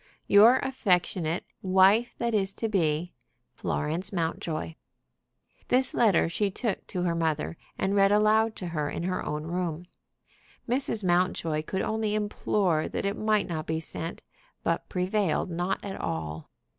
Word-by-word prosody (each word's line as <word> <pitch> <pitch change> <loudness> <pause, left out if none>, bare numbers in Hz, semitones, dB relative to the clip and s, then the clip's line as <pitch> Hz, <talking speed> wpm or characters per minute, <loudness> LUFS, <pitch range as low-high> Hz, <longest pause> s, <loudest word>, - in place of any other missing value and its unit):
"Your 220 +5 +7
affectionate 180 -9 0 0.2
wife 190 +5 +4
that 235 -1 -1
is 195 -2 +1
to 225 - -2
be, 175 -4 0 0.4
"FLORENCE 160 +5 -2
MOUNTJOY." 165 -2 -3 0.9
This 255 +1 +3
letter 210 -9 +4
she 200 +5 0
took 210 +1 -3
to 180 - -3
her 175 -2 +1
mother, 160 -1 -1 0.2
and 195 +1 0
read 195 0 +5
aloud 215 +1 +3
to 180 - -5
her 150 -3 -2
in 165 - -4
her 185 +1 -1
own 150 0 -3
room. 175 0 -3 0.8
Mrs. 240 -3 0
Mountjoy 175 -3 +1
could 190 +5 -3
only 220 -1 -1
implore 200 -5 0
that - - -3
it 200 +1 0
might 215 -1 +1
not 160 -3 -4
be 160 0 -1
sent, 165 +1 -4 0.4
but - - -1
prevailed 185 -1 0
not 175 +3 -1
at 195 - -5
all. 80 -1 -4
185 Hz, 145 wpm, -27 LUFS, 165-210 Hz, 0.9 s, Your